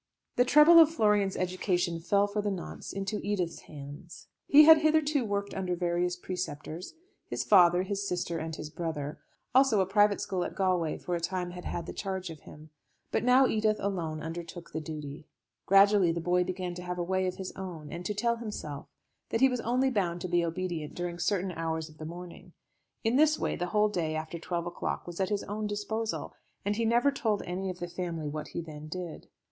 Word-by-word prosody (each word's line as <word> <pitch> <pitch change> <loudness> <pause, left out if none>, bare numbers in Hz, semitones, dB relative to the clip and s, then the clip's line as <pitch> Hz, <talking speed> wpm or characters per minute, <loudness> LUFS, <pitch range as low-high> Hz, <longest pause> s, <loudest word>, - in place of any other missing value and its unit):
The 245 - +4
trouble 300 +6 +8
of 320 -2 +8
Florian's 210 -10 +2
education 180 -1 0
fell 200 +4 +2
for 205 +1 -2
the 205 - -1
nonce 190 -3 -6
into 195 +2 -3
Edith's 190 -5 -1
hands. 145 +4 -10 0.2
He 295 +2 +9
had 320 0 +9
hitherto 310 -3 +2
worked 200 -2 -2
under 185 -2 -2
various 175 0 0
preceptors; 175 - -6 0.3
his - - -2
father, 180 -2 +6
his 200 +1 -3
sister, 175 -2 -2
and 160 0 -4
his 155 -1 -7
brother; 155 -3 -4 0.3
also 260 -5 +5
a 190 - +3
private 205 +1 +3
school 185 -2 -2
at - - -5
Galway 180 -5 +1
for 180 - -5
a 170 - 0
time 180 +1 -2
had 180 0 -9
had 170 - -3
the - - -6
charge 190 -3 -4
of 160 - -10
him. 155 +2 -14 0.4
But - - 0
now 250 +2 +6
Edith 215 -3 +2
alone 165 -6 -3
undertook 170 +1 -7
the 160 - -3
duty. 150 0 -7 0.4
Gradually 195 -2 +6
the 170 - -2
boy 180 +2 +2
began 185 -1 -3
to 180 - -7
have 180 0 -4
a 175 - -1
way 185 +1 0
of 180 - -2
his 190 -1 -6
own, 170 -6 -7
and 170 +1 -6
to 210 - -2
tell 235 +3 +1
himself 180 -11 -6 0.4
that 225 - -1
he 265 - +7
was 250 -2 -2
only 255 +3 +1
bound 180 -6 0
to 185 - -3
be 175 -1 +2
obedient 170 -2 -3
during 175 -1 -4
certain 190 -1 0
hours 160 -1 -3
of 155 - -18
the 155 - -6
morning. 175 +2 -9 0.5
In 230 +3 +2
this 310 +1 +5
way - - -1
the 175 - -2
whole 210 +3 +3
day 170 -6 -2
after 160 +2 -4
twelve 170 0 -3
o'clock 175 - -3
was 175 0 -8
at 190 -1 +1
his 205 -1 -1
own 210 +1 -3
disposal, 220 +2 -3 0.3
and 205 +1 +1
he 230 +1 0
never 240 +5 +3
told 220 -6 -1
any 185 +2 -3
of 180 - -5
the 175 - -5
family 170 -3 -4
what 150 +1 -4
he 170 - -5
then 155 -2 -9
did. 175 0 -6
180 Hz, 210 wpm, -29 LUFS, 170-210 Hz, 0.5 s, He